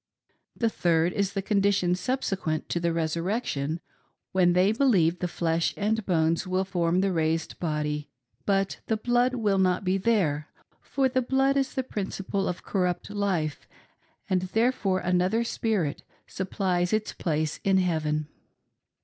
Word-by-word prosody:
The 230 - +1
third 170 -4 +1
is 200 -1 0
the 195 -1 -2
condition 200 -3 +2
subsequent 190 - -2
to 170 - 0
the 170 0 0
Resurrection, 165 - -1 0.5
when 180 -2 +4
they 185 +3 +4
believe 200 -9 +3
the 180 - -1
flesh 165 -1 0
and 220 +2 0
bones 165 0 +1
will 185 +1 +1
form 180 -2 +1
the 195 0 +1
raised 160 -1 -1
body, 150 -2 -2 0.4
but 195 -1 +1
the 220 - +1
blood 245 +3 +2
will 205 -5 +1
not 185 0 +2
be 190 +1 +1
there; 180 -9 +1 0.3
for 270 -1 0
the 260 0 +1
blood 270 +2 +2
is 270 0 0
the 260 - 0
principle 195 -3 -3
of 180 - -4
corrupt 180 0 -1
life, 185 -8 -1 0.6
and 185 -1 +1 0.2
therefore 225 -6 +2
another 180 +6 +1
spirit 210 -10 -1 0.2
supplies 185 -2 -1
its 215 0 0
place 155 -2 -1
in 195 -1 +3
heaven. 155 -4 0
185 Hz, 145 wpm, -27 LUFS, 165-210 Hz, 0.6 s, when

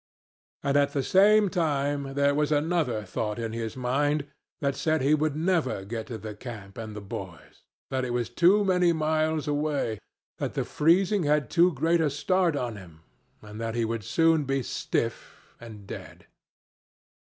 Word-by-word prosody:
And 140 0 +2
at 140 0 +2
the 140 - 0
same 205 +4 +5
time 145 -5 -1
there 140 0 +3
was 150 +1 0
another 150 -7 +1
thought 105 +2 -3
in 115 -1 -4
his 115 +1 -4
mind 140 +4 0 0.3
that 140 -1 0
said 155 -3 0
he 140 +3 +4
would 155 -1 +1
never 160 - 0
get 110 +2 -5
to 115 - -5
the 110 0 -7
camp 105 -4 -9
and 110 -2 -7
the 105 - -6
boys; 85 -5 -9 0.3
that 130 -1 0
it 125 - -3
was 120 -1 -1
too 185 +10 +4
many 180 -2 +3
miles 155 -1 0
away, 145 -7 -1 0.4
that - - -3
the - - -1
freezing 185 +6 +3
had 150 -5 +1
too 175 +2 +5
great 165 +5 +2
a 155 - +2
start 170 +3 +1
on 120 -5 -3
him, 85 -5 -13 0.4
and 105 +1 -9
that 115 0 -3
he 115 -1 +1
would 115 -1 -3
soon 160 +6 +3
be 135 -1 -1
stiff - - -4
and 110 -4 -11
dead. - - -9
140 Hz, 175 wpm, -27 LUFS, 115-160 Hz, 0.4 s, same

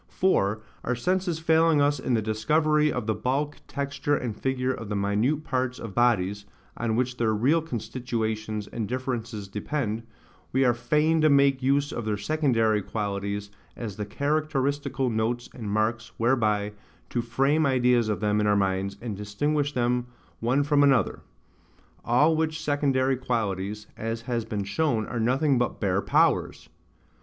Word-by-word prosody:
For, 110 - +1 0.2
our 125 - 0
senses 180 +6 0
failing 160 -1 +3
us 145 -1 +2
in 130 -1 0
the 110 - 0
discovery 150 +8 +2
of - - -3
the 110 - +1
bulk, 140 +6 -1
texture, 140 +1 -1
and 120 -5 -4
figure 130 +1 -1
of 115 -4 -7
the 105 - -2
minute 105 +10 +1
parts 130 -3 -1
of 110 -4 -7
bodies, 105 -4 +1 0.3
on 115 -1 -1
which 125 +1 -1
their 110 -2 +1
real 140 +10 +3
constitutions 110 -5 -3
and 110 0 -4
differences 120 -4 -4
depend, 110 +2 -3 0.5
we 130 +1 +3
are 120 - +4
fain 155 +6 +2
to 155 - +5
make 140 -1 +4
use 140 +2 +2
of 120 - -4
their 105 -1 -1
secondary 115 -4 +1
qualities 100 0 -3 0.2
as 110 -5 -6
the 105 - -4
characteristical 140 0 -1
notes 115 +2 -1
and 110 -5 -6
marks 115 +3 -1
whereby 110 -4 +1 0.4
to 120 - 0
frame 135 +6 +2
ideas 125 -3 +3
of 105 - -1
them 105 0 +2
in 105 - +1
our 105 - +4
minds, 95 0 0
and 110 -4 -3
distinguish 145 +9 -1
them 125 -1 0 0.3
one 125 +5 +2
from 145 0 +3
another: 140 -2 +3 0.8
all 150 +7 +4
which 160 0 -1
secondary 135 -2 +1
qualities, 105 -5 -2
as 115 +1 -4
has 115 -1 -2
been 105 -2 -3
shown, 110 +1 0
are 120 - -4
nothing 130 +4 +2
but 120 - -1
bare 100 -1 +1
powers. - - +1
120 Hz, 160 wpm, -26 LUFS, 110-140 Hz, 0.8 s, to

